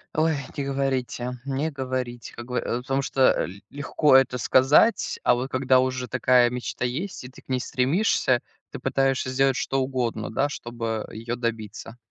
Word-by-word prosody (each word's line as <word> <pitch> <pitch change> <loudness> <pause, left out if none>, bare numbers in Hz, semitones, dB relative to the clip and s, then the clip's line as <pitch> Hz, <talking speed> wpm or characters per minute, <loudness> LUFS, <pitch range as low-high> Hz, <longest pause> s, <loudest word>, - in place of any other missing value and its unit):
Ой, 160 0 +2 0.2
не 140 - -1
говорите, 130 -2 -2
не 140 +3 -1
говорите, 130 -4 -4
как 120 - -8
гов 125 0 -2
э, 120 - -1
потому 135 +1 -1
что, 135 0 -2 0.2
э, - - -7 0.2
легко 145 0 +2
это 130 -1 +4
сказать, 135 - +3
а - - +4
вот 125 +2 -4
когда 130 0 +3
уже 130 -1 -1
такая 125 -1 +4
мечта 125 0 -4
есть 160 +10 -4
и 125 - -9
ты 130 - -16
к - - -37
ней 130 -1 +1
стремишься, 130 - +1 0.3
ты - - -7
пытаешься 135 -1 0
сделать 135 0 +2
что 135 - -1
угодно, 125 -4 -2
да, 135 +5 +1
чтобы 115 -4 -4
её 115 +2 -4
добиться. 115 -1 -5
130 Hz, 175 wpm, -25 LUFS, 120-135 Hz, 0.3 s, это